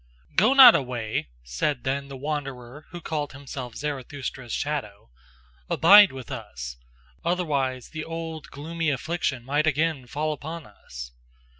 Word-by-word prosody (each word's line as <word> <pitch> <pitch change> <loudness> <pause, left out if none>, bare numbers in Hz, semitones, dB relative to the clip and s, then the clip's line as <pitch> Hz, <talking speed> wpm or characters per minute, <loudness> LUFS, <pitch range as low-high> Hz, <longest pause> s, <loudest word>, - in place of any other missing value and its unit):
"Go 270 - +4
not 260 -4 +11
away!" 120 -5 -2 0.2
said 65 - -2
then 140 +1 -2
the 135 -1 -8
wanderer 140 -1 -5
who 175 0 -8
called 150 -3 -3
himself 130 -3 -7
Zarathustra's 135 -3 -5
shadow, 105 - -4 0.6
"abide 205 0 +8
with 130 -2 -9
us - - -7 0.5
otherwise 140 -8 -1
the 160 -1 -5
old 165 -1 -6
gloomy 165 +2 -3
affliction 140 -3 -2
might 145 +3 +1
again 155 -3 0
fall 150 +4 -1
upon 160 +2 -7
us. 60 - -10
140 Hz, 130 wpm, -25 LUFS, 125-160 Hz, 0.6 s, not